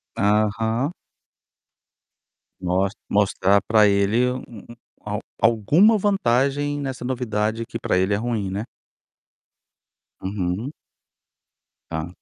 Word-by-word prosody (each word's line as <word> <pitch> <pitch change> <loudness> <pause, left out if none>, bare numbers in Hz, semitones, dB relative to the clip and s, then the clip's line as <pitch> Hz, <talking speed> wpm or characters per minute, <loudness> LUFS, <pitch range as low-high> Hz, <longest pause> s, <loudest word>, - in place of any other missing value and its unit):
Aham. 110 - +1 1.7
Mostr 95 +2 0
mostrar 100 -1 +3
para 110 -2 +5
ele 105 +5 +2
um 130 - -4
um 120 +1 -12 0.3
al 105 0 -2 0.2
alguma 145 - +4
vantagem 145 - +1
nessa 130 -3 -5
novidade 115 -3 -1
que - - -6
para 90 - 0
ele 95 +2 +1
é - - +2
ruim, 110 -4 -2
né. 100 +4 -3 1.6
Uhum. 95 +6 -3 1.2
Hã. 80 +1 -3
110 Hz, 100 wpm, -23 LUFS, 100-125 Hz, 1.7 s, para